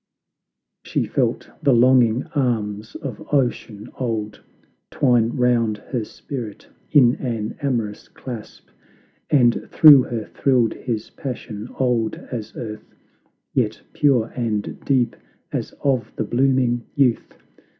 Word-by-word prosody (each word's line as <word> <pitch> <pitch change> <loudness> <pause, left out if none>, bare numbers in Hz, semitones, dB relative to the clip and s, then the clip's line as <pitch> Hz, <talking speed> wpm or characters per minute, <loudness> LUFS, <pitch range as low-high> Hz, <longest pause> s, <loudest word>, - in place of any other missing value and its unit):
She - - -1
felt - - -1
the 140 -3 +4
longing 125 -1 +4
arms 110 -6 -1
of 130 -7 -6
Ocean 120 -6 -1
old 110 -4 -3 0.5
Twine 120 -4 +3
round 120 -3 +2
her 115 +2 -4
spirit 115 -2 -7 0.2
in 125 -5 +6
an 115 -4 -3
amorous 115 -7 -2
clasp, 120 -5 -9 0.6
And 120 -5 +3
through 150 -4 +9
her 115 -3 -4
thrilled 125 -4 +1
his 115 -4 -4
passion, 115 -5 -6
old 120 -4 +1 0.2
as 115 -4 -6
earth, 110 -3 -8 0.6
Yet - - 0
pure 125 -6 +2
and 110 -5 -2
deep 125 -4 +1 0.4
as - - -3
of 130 -4 +1
the - - -1
blooming 125 0 +1
youth. 130 -5 +1
120 Hz, 115 wpm, -22 LUFS, 110-130 Hz, 0.6 s, through